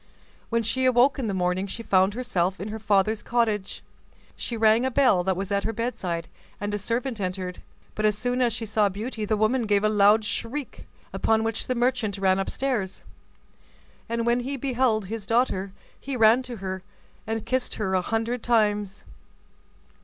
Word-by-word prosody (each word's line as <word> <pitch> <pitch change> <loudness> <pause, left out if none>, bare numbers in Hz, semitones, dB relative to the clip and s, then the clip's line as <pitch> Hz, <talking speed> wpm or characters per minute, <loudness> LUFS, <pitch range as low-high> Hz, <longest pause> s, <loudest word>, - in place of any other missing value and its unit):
When 230 0 +1
she 260 +4 0
awoke 255 +2 +4
in 245 - -1
the 200 - -1
morning, 180 +1 0
she 230 +4 -6
found 190 0 +3
herself 195 -7 -1
in 200 - -5
her 220 +1 -5
father's 210 +1 +2
cottage. 220 -5 -1 0.5
She 235 - -4
rang 220 +1 +4
a 260 - +1
bell 250 -9 +3
that 190 0 0
was 195 +1 -4
at 200 0 +1
her 225 - -2
bedside, 190 -8 -3 0.3
and 205 0 -3
a 205 - -1
servant 230 +2 -2
entered; 185 -1 -4 0.3
but 215 - -3
as 210 -1 +2
soon 245 +3 -1
as 240 -2 +3
she 225 +1 -4
saw 215 -1 +2
Beauty 215 +3 -4
the 215 +1 0
woman 220 +2 +1
gave 205 -1 +2
a 215 - +4
loud 210 +1 +4
shriek; 255 +6 -4 0.3
upon 220 0 +2
which 225 0 -2
the 255 - 0
merchant 240 -4 0
ran 190 -1 +2
upstairs, 210 -2 -2 1.1
and 230 0 -1
when 235 +1 +2
he 270 +3 -3
beheld 245 -5 +1
his 210 0 -6
daughter 215 -5 +1 0.3
he 275 -1 -4
ran 225 +2 +6
to 250 -2 -7
her, 190 -2 -5 0.5
and 225 -1 -3
kissed 255 -1 -1
her 195 -3 -2
a 185 - +3
hundred 225 +4 -2
times. 210 -4 +1
220 Hz, 185 wpm, -25 LUFS, 200-240 Hz, 1.1 s, ran